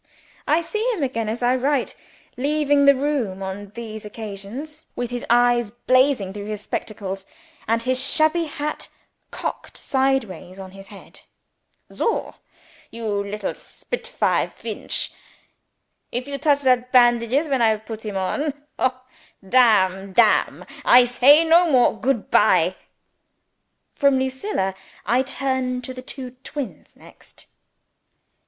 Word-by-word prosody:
I 320 +3 +3
see 430 +6 -3
him 330 - -3
again 230 -5 -2
as 235 +3 -4
I 245 +1 +3
write, 270 +1 0 0.4
leaving 290 +1 +2
the 280 0 +7
room 260 -9 -2
on 195 +1 -6
these 220 -2 -7
occasions, 215 +7 -8
with 245 -1 -4
his 245 -1 -4
eyes 240 -1 +3
blazing 245 -3 +1
through 205 0 -7
his 210 -1 -4
spectacles, 195 -2 -5 0.4
and 230 +1 +1
his 255 +1 +1
shabby 315 +4 +3
hat 300 0 -4 0.4
cocked - - -6
sideways 230 - -1
on 190 -1 -9
his 195 0 -12
head. 200 0 -14 0.7
"Soh, 455 - -1 0.6
you 215 -3 -3
little 205 0 -4
spitfire - - -2
Feench! - - -4 1.0
If 250 +2 -3
you 280 0 -4
touch 285 0 +2
that 250 -1 +2
bandages 240 +3 +4
when 270 -4 0
I 230 - +5
have 220 0 -2
put 220 -1 -7
him 210 -3 -4
on 280 +10 -1 0.3
Ho 255 0 0 0.5
Damn 195 -5 +3
Damn! 220 +1 +3 0.2
I 245 0 +7
say 275 +6 +5
no 335 +1 +5
more. 255 -6 +4
Good 235 0 -1
bye!" - - +4 1.2
From 280 -1 +3
Lucilla 260 - -2 0.3
I 245 +2 +2
turn 260 -1 -2
to 260 - -6
the 255 - -8
twin 255 -1 -8 0.4
brothers - - -25
next. - - -16
245 Hz, 135 wpm, -22 LUFS, 215-275 Hz, 1.2 s, the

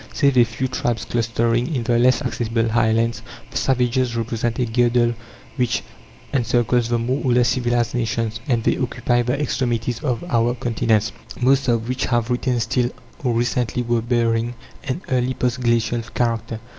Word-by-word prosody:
Save 140 -2 +3
a - - +8
few 120 +3 -2
tribes 120 -3 -2
clustering 115 +3 0
in 120 - -1
the 120 0 +2
less 125 +1 +3
accessible 115 -1 -1
highlands, 115 0 +1 0.3
the - - -3
"savages" 125 -1 +1
represent 115 0 -2
a 125 - +1
girdle 120 0 +2 0.4
which 125 -2 0 0.5
encircles 120 -2 +1
the 120 - +2
more 125 +5 -1
or 130 -3 +2
less 120 -1 +4
civilized 120 -2 0
nations, 115 -2 -1
and 120 -4 +1
they - - +2
occupy 125 -1 0
the 125 +4 -1
extremities 120 -4 -1
of 125 -6 -1
our 120 +1 +1
continents, 115 -3 +1 0.3
most 135 +2 +3
of 115 -1 +1
which 125 +1 -1
have 120 -1 0
retained 125 -1 0
still, 125 -2 0 0.3
or 125 -3 +1
recently 120 +1 0
were 120 -1 +1
bearing, 115 0 0 0.3
an 150 +8 -3
early 130 -1 +1
post 125 0 -1
glacial 120 0 +1
character. 115 -2 -1
120 Hz, 165 wpm, -21 LUFS, 115-125 Hz, 0.5 s, a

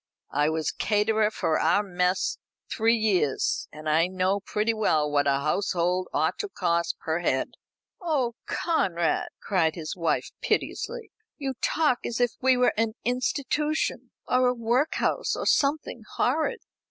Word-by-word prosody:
I 145 +2 +2
was 160 0 -1
caterer 215 0 +1
for 160 -7 0
our 205 - +3
mess 180 -1 0 0.3
three 225 0 +3
years, 195 - +1
and 155 +1 -9
I 160 +3 +3
know 185 +2 0
pretty 210 +3 -1
well 160 -9 +2
what 145 -1 +1
a 140 0 +2
household 180 +3 0
ought - - 0
to 415 - -3
cost 170 - 0
per 160 +1 -2
head." 130 -6 0 0.5
"Oh, 285 -9 0
Conrad!" 175 - 0
cried 165 -5 +1
his 160 -2 -5
wife 170 -2 -1
piteously, 470 -1 -2 0.3
"you 275 -3 -3
talk 300 -6 +2
as 235 - -3
if 245 -2 +3
we 260 0 +4
were 250 - +3
an 225 0 0
institution, 285 +5 -1 0.2
or 255 0 +3
a 250 - +1
workhouse, 250 - 0
or - - -4
something 280 -4 +1
horrid." 315 - 0
210 Hz, 145 wpm, -26 LUFS, 170-255 Hz, 0.5 s, we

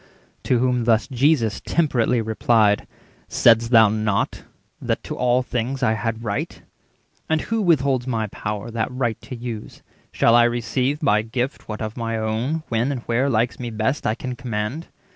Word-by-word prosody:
To 125 - +3
whom 125 -1 +1
thus 115 -1 +3
Jesus 130 -4 +1
temperately 125 -7 +1
replied:— 110 -1 +2 0.4
"Said'st 115 0 +4
thou 110 -2 +7
not 110 -1 -1 0.4
that - - -2
to - - -5
all 125 +1 +2
things 125 +2 -3
I 110 - +3
had 115 +1 -3
right? 105 -3 -4 0.7
And 160 -1 +2
who 225 0 -1
withholds 140 -8 +2
my 115 -3 -1
power 105 +2 -5
that 115 +1 -2
right 125 -3 -2
to 130 - -8
use? 115 -3 -7 0.3
380 - - -15
Shall 115 - +5
I 120 - +7
receive 125 +4 0
by 105 -7 +3
gift 120 +5 -4
what 105 +1 -4
of 110 +2 -5
my 115 -1 -2
own, 115 +9 -2
When 115 +4 0
and 130 -4 -4
where 125 +4 +1
likes 120 0 0
me 120 -1 -4
best, 115 +5 -1
I 110 - +1
can 125 +1 -5
command? 120 +6 -4
120 Hz, 175 wpm, -22 LUFS, 110-130 Hz, 0.7 s, thou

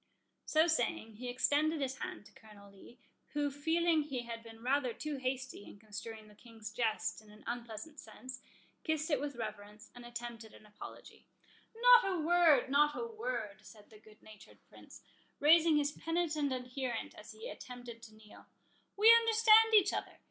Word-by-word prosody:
So 315 +1 +4
saying, 235 -8 -1
he 250 +2 -6
extended 290 +5 +1
his 265 -1 -3
hand - - -6
to - - -16
Colonel 205 -2 -16
Lee, 200 +5 -16 0.4
who, 290 -1 0
feeling 320 +3 +1
he 270 -5 -4
had 230 -1 -7
been 225 0 -13
rather 260 -1 +1
too 305 -2 -4
hasty 260 -3 -4
in 205 - -13
construing 215 +1 -9
the 210 - -17
King's 225 0 -11
jest 220 -1 -1
in 215 - -19
an 210 +1 -16
unpleasant 240 +5 -6
sense, 255 +4 -10 0.4
kissed 315 0 -1
it 285 -3 +1
with 285 -2 -4
reverence, 210 -1 -8
and 245 - -12
attempted 235 -2 -8
an - - -17
apology. 210 0 -12 0.5
"Not - - +7
a - - -2
word—not 295 -3 +4
a - - -3
word," 255 - -5
said 210 -1 -16
the 215 - -15
good 215 0 -20
natured 215 -2 -15
Prince, - - -15 0.4
raising 320 +1 +5
his 290 0 +1
penitent 315 -3 -1
adherent 250 -1 -4
as 210 +1 -12
he 220 +1 -9
attempted 245 -2 -9
to 220 -2 -13
kneel; 215 -1 -17 0.5
"we 440 +3 +8
understand 450 -1 +6
each 405 -1 +5
other. - - -4
250 Hz, 170 wpm, -33 LUFS, 220-310 Hz, 0.5 s, we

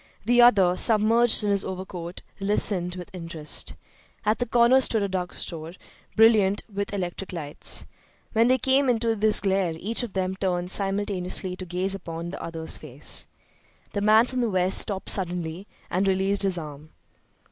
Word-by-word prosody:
The 240 +2 +4
other, 195 -7 +5
submerged 225 +1 +4
in 205 - 0
his 200 -1 +1
overcoat, 185 -2 -7 0.2
listened 195 -3 +1
with 180 0 -10
interest. 165 -4 -2 0.5
At 215 +1 +1
the 245 - -2
corner 240 +3 +4
stood 220 -4 +2
a - - 0
drug 185 -2 -3
store, 165 -1 -5 0.4
brilliant 215 -3 +4
with 200 0 -3
electric 190 -1 -5
lights. 155 -5 -3 0.5
When 230 +1 +3
they 255 +1 +3
came 265 +2 +2
into 230 -1 +1
this 215 0 +4
glare 190 -3 0
each 220 +9 -1
of 235 -5 -6
them 190 0 -2
turned 180 -2 -2
simultaneously 195 -2 0
to 185 - -8
gaze 185 +3 -2
upon 170 -2 -6
the - - -8
other's 165 -1 -3
face. 145 -1 -4 0.7
The 200 - -2
man 215 +3 +5
from 255 0 -3
the 235 - 0
West 185 -1 +3
stopped 195 -2 0
suddenly 180 0 -3 0.2
and 190 +2 0
released 195 +1 +1
his 190 -3 0
arm. 150 -1 -9
195 Hz, 165 wpm, -25 LUFS, 180-215 Hz, 0.7 s, other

